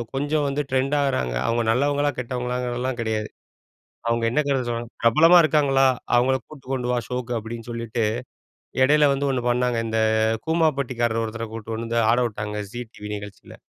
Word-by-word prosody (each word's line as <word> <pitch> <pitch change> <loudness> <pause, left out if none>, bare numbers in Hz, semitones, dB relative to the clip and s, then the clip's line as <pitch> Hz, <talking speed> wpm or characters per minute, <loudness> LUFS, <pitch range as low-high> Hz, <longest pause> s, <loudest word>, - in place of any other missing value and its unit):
கொஞ்சம் 145 +2 0
வந்து 140 +1 -1
ட்ரெண்ட் 135 +2 +1
ஆகறாங்க. 130 - 0
அவங்க 115 +1 +1
நல்லவங்களா 145 +4 +1
கெட்டவங்களாங்கிறதெல்லாம் 125 0 -3
கிடையாது. 110 -1 -2 0.8
அவங்க 115 0 +1
என்னங்க 140 +2 +1
சொன்னாங் 120 0 -3
''பிரபலமா 155 +10 +6
இருக்காங்களா! 140 -3 +3 0.3
அவங்கள 130 +2 +3
கூட்டி 145 -4 -14
கொண்டு 125 -2 -2
வா, - - +1
ஷோக்கு.'' 125 -1 -3
அப்படின்னு 115 +1 -7
சொல்லிட்டு 115 0 -2 0.8
இடையில 150 +2 +5
வந்து 140 +1 0
1 130 -2 -1
பண்ணாங்க. 125 -1 +1
இந்த 110 0 0 0.5
கூமாபட்டிக்காரர் 135 -8 +1
ஒருத்தர 115 +1 -5
கூட்டிட்டு 115 0 -5
வந்து 115 0 -2
ஆட 120 - +3
விட்டாங்க 105 -1 -5
ஜி 120 0 -4
டிவி 105 - -8
நிகழ்ச்சில. 100 -2 -11
125 Hz, 150 wpm, -23 LUFS, 115-140 Hz, 0.8 s, பிரபலமா